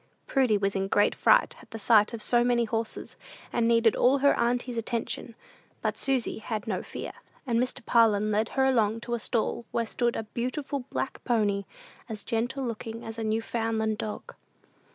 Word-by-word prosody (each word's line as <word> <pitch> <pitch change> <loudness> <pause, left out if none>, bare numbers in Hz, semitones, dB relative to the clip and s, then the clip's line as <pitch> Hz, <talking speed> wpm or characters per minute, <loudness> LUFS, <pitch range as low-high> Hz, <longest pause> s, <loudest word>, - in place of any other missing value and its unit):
Prudy 255 -6 +2
was 195 0 -1
in 195 0 0
a - - -4
great 205 +1 +3
fright - - +4
at 225 - -9
sight 215 -1 +5
of 230 -3 -5
so 240 -1 +3
many 240 -1 +2
horses, 225 0 -4 0.4
and 230 - +2
needed 230 -1 +4
all 260 +3 +4
her 280 +1 +4
auntie's 245 +1 0
attention; 230 0 -3 0.5
but - - 0
Susy 265 -5 0
had 220 -1 -4
no 195 -4 -2
fear, - - -7 0.3
and 235 -3 +1
Mr. 255 0 -2
Parlin 215 -3 +4
led 215 +2 +1
her 265 - +4
along 225 -4 +2
to 240 - -4
a 235 - 0
stall 235 +1 -1
where 230 - -1
stood 240 +1 -1
a - - -2
beautiful 255 +6 -3
black - - -4
pony, 205 -5 +1 0.4
as 215 -2 -6
gentle 245 +3 -1
looking 230 0 -5
as 225 0 -6
a - - -2
Newfoundland 220 0 -1
dog. 215 - -5
230 Hz, 180 wpm, -28 LUFS, 220-245 Hz, 0.5 s, sight